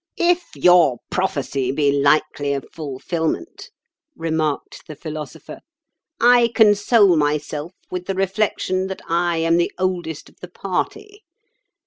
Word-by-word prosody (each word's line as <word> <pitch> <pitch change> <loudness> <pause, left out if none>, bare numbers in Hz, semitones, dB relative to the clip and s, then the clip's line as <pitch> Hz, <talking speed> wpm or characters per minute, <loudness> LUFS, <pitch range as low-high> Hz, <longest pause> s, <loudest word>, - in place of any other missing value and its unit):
"If 350 0 +1
your 175 -8 +5
prophecy 140 -8 -1
be 140 0 +2
likely 145 0 +1
of 140 -2 -4
fulfilment," 160 - -4 0.5
remarked 160 - -3
the 155 - -8
Philosopher, 155 0 -8 0.6
"I 240 0 +5
console 205 -2 +5
myself 150 +2 -1 0.2
with 180 0 -5
the 195 - -2
reflection 190 -1 -1
that 190 - -6
I 170 0 +1
am 165 +1 +2
the 175 - +1
oldest 175 -4 -3
of - - -21
the 180 - -10
party. 410 - -4
170 Hz, 120 wpm, -21 LUFS, 150-190 Hz, 0.6 s, your